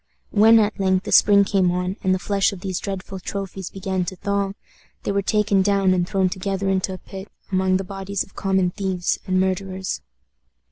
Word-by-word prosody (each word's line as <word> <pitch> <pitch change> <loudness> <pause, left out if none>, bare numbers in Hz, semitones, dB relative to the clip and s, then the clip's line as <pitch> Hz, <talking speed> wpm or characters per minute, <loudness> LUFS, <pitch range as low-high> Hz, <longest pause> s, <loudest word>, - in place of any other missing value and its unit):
When 225 +2 +6
at 215 -1 +1
length 190 -1 +2
the - - -5
spring 200 -1 +6
came 195 -2 +2
on, 180 +1 -1
and 190 - +2
the 185 - +3
flesh 195 +3 +1
of 195 -3 -9
these 190 -1 -3
dreadful 195 -1 -5
trophies 195 0 -5
began 190 -1 -2
to 185 - -5
thaw, 200 +1 -1 0.5
they - - -1
were 200 0 +1
taken 210 -1 +2
down 195 -1 +3
and 180 0 0
thrown 190 -2 +2
together 195 +1 -2
into 190 0 0
a - - -6
pit, 190 +2 -10 0.2
among 185 0 +2
the 190 - -3
bodies 195 +1 -4
of - - -20
common 190 -2 +1
thieves 190 -2 -1
and 185 0 +2
murderers. 190 0 -2
190 Hz, 195 wpm, -22 LUFS, 185-200 Hz, 0.5 s, When